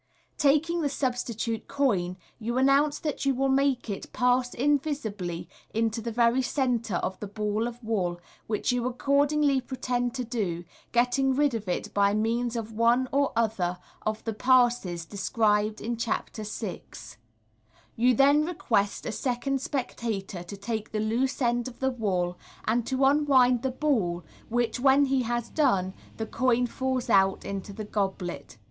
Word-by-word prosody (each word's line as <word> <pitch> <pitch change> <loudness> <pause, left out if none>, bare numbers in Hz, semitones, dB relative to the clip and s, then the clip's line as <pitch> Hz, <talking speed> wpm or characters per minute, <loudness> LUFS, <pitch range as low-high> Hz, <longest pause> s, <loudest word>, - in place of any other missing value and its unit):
Taking 305 +4 +3
the 290 - +1
substitute 240 -4 -2
coin, 190 -11 0 0.2
you 235 +2 -2
announce 275 +3 +4
that 300 -2 -3
you 275 -1 +2
will 270 +1 +1
make 270 -2 +2
it 200 -3 -5
pass 250 0 +2
invisibly 245 - -1 0.3
into 225 0 0
the 230 +1 -4
very 235 +2 +3
centre 245 -6 0
of 185 +2 -2
the 205 - -5
ball 210 +2 -1
of 240 0 -9
wool, 185 -6 -1 0.3
which 215 +3 0
you 245 0 0
accordingly 280 +2 +2
pretend 245 -1 -2
to 255 - -2
do, 205 -8 -2 0.3
getting 250 +2 +2
rid 290 -1 +2
of 220 -3 -4
it 175 - -3
by 200 0 +3
means 230 +2 0
of 225 -1 -4
one 235 +3 +3
or 280 0 +2
othei 200 -6 0 0.3
of 215 0 -2
the 225 - -2
Passes 240 -8 +2
described 210 +2 +1
in 235 +1 -3
Chapter 230 -1 -3
VL 190 - -7 0.8
You 245 +2 +3
then 285 +4 +5
request 230 - 0
a - - -2
second 255 +3 -1
spectator 225 -9 -3
to 175 +3 -8
take 215 +2 -4
the 215 - -1
loose 245 +6 0
end 240 0 +1
of 245 - -9
the 265 0 +1
wool, 185 -7 -1 0.3
and 230 +1 +1
to 265 0 +2
unwind 270 -4 +4
the 265 - 0
ball, 225 - 0 0.3
which, 240 0 0
when 270 +2 +5
he 265 -1 +1
has 240 0 -2
done, 195 -12 +2 0.2
the 220 - -2
coin 245 +1 +1
falls 260 +1 -2
out 195 0 +3
into 200 0 -5
the 210 +2 -6
goblet. 190 - -3
235 Hz, 160 wpm, -27 LUFS, 210-265 Hz, 0.8 s, then